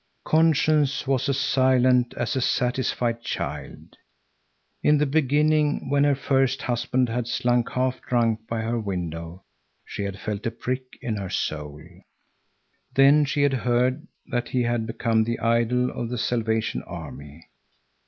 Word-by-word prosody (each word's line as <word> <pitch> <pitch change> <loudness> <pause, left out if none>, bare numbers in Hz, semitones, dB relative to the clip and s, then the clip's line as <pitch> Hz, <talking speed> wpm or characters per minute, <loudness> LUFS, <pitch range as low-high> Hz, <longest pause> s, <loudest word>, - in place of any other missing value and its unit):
Conscience 155 -3 +3
was 135 0 0
as 135 - +1
silent 130 -2 +3
as 120 - -1
a 130 - 0
satisfied 120 -1 0
child. - - -6 0.8
In 150 - +4
the 150 - +2
beginning, 150 0 +1
when 145 0 +3
her 145 -1 +3
first 135 -1 +1
husband 125 +1 0
had 120 +1 -2
slunk 120 -1 +1
half 130 0 -1
drunk 115 -2 0
by 115 -1 -2
her 115 +1 -1
window, 85 -3 -5 0.4
she - - -6
had 100 -1 -4
felt 105 0 -4
a - - +2
prick 130 +3 -5
in 110 -3 -2
her 95 -2 -5
soul. 75 -2 -4 1.1
Then 140 +2 +6
she 145 +1 0
had 140 -1 +3
heard 125 0 0 0.2
that 120 -1 -1
he 125 -1 0
had 120 -1 -1
become 115 -1 +1
the 115 +1 -2
idol 120 +2 +1
of 120 - -4
the 125 - -3
Salvation 110 -1 -1
Army. 75 +3 -9
125 Hz, 145 wpm, -24 LUFS, 115-135 Hz, 1.1 s, Then